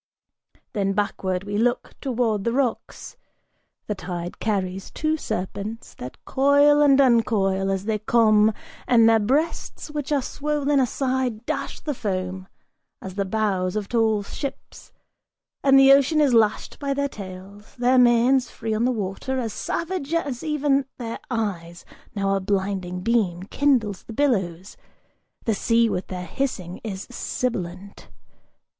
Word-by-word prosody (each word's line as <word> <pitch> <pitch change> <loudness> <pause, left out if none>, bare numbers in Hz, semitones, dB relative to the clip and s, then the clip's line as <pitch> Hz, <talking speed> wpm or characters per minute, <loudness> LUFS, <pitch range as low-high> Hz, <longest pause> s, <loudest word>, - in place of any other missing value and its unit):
Then 195 -3 0
backward 190 -2 -1
we 205 +1 -2
look 240 +2 0
towards 235 -6 0
the 235 - 0
rocks; 255 -3 -2 0.7
the 210 - -2
tide 175 -2 -6
carries 190 -3 -2
two 310 0 -1
serpents 205 - -5
That 125 - -10
coil 285 +2 +4
and 280 -2 +5
uncoil 210 -7 +3
as 195 0 -1
they 215 -1 0
come, 215 -1 +4 0.4
and 230 -2 +6
their 225 0 +5
breasts, 290 +7 -1
which 295 -1 -4
are 280 -3 +2
swollen 290 0 0
Aside 255 -3 -1
dash - - -4
the 295 - -2
foam, 185 -4 -3 0.5
as 190 - -8
the 200 +1 -1
bows 190 -2 0
of 210 -2 -2
tall 220 -3 +1
ships; 275 +7 -7 0.7
and 270 -1 +6
the 270 0 +8
ocean 280 +3 +4
Is 285 -4 +4
lashed 220 -2 +2
by 280 -1 -1
their 280 0 0
tails, 200 -2 -10
their 250 +1 +3
manes, 245 +1 +4
free 220 -1 -4
on 220 +2 +1
the 255 - +2
water, 215 +4 -3
as 230 -4 -2
savage 335 -3 -3
As 285 -7 -2
even 290 -3 +1
their 230 -2 -5
eyes: 185 -8 -3 0.3
now 195 -1 +1
a - - +1
blinding 190 -2 -2
beam 190 -5 +1
kindles 225 -4 +1
the 225 - -10
billows, 190 - -1 0.7
The 225 - +2
sea 230 +2 +2
with 180 - -3
their 180 -1 -5
hissing 185 -4 -4
is 200 -3 -5
sibilant! 195 -7 -4
225 Hz, 145 wpm, -24 LUFS, 195-265 Hz, 0.7 s, the